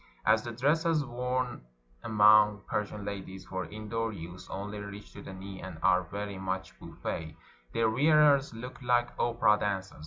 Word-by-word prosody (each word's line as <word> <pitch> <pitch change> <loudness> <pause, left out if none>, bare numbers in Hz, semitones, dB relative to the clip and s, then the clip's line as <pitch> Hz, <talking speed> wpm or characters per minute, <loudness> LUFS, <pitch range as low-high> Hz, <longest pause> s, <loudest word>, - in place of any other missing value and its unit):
As 110 +1 +5
the 120 - -6
dresses 150 +5 +2
worn 125 - -2 0.4
among 105 -2 +5
Persian 105 -1 -3
ladies 95 -2 -6
for 95 -2 -4
indoor 110 +5 -3
use 90 -1 -9
only 100 +2 -5
reach 100 0 -9
to 100 - -9
the - - -9
knee 95 0 -8
and 95 -3 -7
are 90 -1 +5
very 100 +2 -6
much 95 0 -3
boujje, 80 -1 -6 0.4
their 115 -1 +2
wearers 145 +3 +4
look 125 +2 -8
like 120 -1 +2
opera 120 -3 +3
dancers. 95 -4 -3
105 Hz, 155 wpm, -30 LUFS, 95-120 Hz, 0.4 s, As